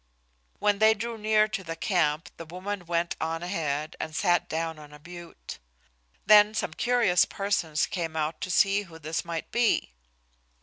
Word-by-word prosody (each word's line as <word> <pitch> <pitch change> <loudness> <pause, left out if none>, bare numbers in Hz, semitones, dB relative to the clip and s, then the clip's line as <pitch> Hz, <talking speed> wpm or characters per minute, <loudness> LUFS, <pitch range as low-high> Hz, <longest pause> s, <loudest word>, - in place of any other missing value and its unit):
When 205 -1 +1
they 220 0 +6
drew 230 +2 -4
near 215 0 +3
to 195 - -4
the 165 -1 -5
camp 165 -3 0
the 165 - -8
woman 185 +2 -6
went 170 0 0
on 165 +1 -2
ahead 155 -4 -2
and 155 - -5
sat 175 -1 +2
down 160 0 -3
on 150 -1 -13
a - - -11
butte. 170 +2 -10 0.7
Then 210 +1 +7
some - - -2
curious 235 -8 +3
persons 175 -6 -1
came 165 -3 -4
out 155 0 -2
to - - -3
see 195 +3 +3
who 170 -5 -12
this 160 +1 -3
might 170 -2 -5
be. 235 - +1
175 Hz, 170 wpm, -27 LUFS, 160-205 Hz, 0.7 s, Then